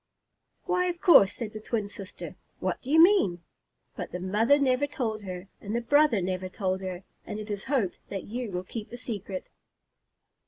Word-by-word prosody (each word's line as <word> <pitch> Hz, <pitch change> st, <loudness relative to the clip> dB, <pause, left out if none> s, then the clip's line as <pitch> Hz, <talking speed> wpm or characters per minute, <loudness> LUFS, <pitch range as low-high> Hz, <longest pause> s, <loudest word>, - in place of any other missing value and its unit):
"Why, 360 Hz, -1 st, +1 dB
of 350 Hz, -1 st, -2 dB
course," 245 Hz, -, +7 dB
said 220 Hz, -2 st, -6 dB
the 215 Hz, -, -6 dB
twin 215 Hz, -1 st, -2 dB
sister. 200 Hz, -1 st, -9 dB, 0.2 s
"What -, -, -2 dB
do 260 Hz, -, -9 dB
you 315 Hz, +2 st, +5 dB
mean?" 325 Hz, -, +5 dB, 0.5 s
But -, -, -5 dB
the 180 Hz, -, -4 dB
mother 210 Hz, +9 st, +3 dB
never 275 Hz, 0 st, +2 dB
told 225 Hz, -6 st, -3 dB
her, 185 Hz, -1 st, -7 dB
and 205 Hz, +3 st, -4 dB
the -, -, +2 dB
brother 285 Hz, -5 st, +4 dB
never 185 Hz, 0 st, -2 dB
told 190 Hz, -1 st, -2 dB
her, 185 Hz, -1 st, -5 dB, 0.2 s
and 210 Hz, -, -6 dB
it 215 Hz, 0 st, -6 dB
is 200 Hz, -1 st, -4 dB
hoped 255 Hz, -10 st, 0 dB
that 195 Hz, -2 st, -4 dB
you 240 Hz, +1 st, -4 dB
will 180 Hz, 0 st, -3 dB
keep 215 Hz, +3 st, -7 dB
the 240 Hz, -, -8 dB
secret. 205 Hz, -6 st, -5 dB
215 Hz, 190 wpm, -28 LUFS, 190-260 Hz, 0.5 s, course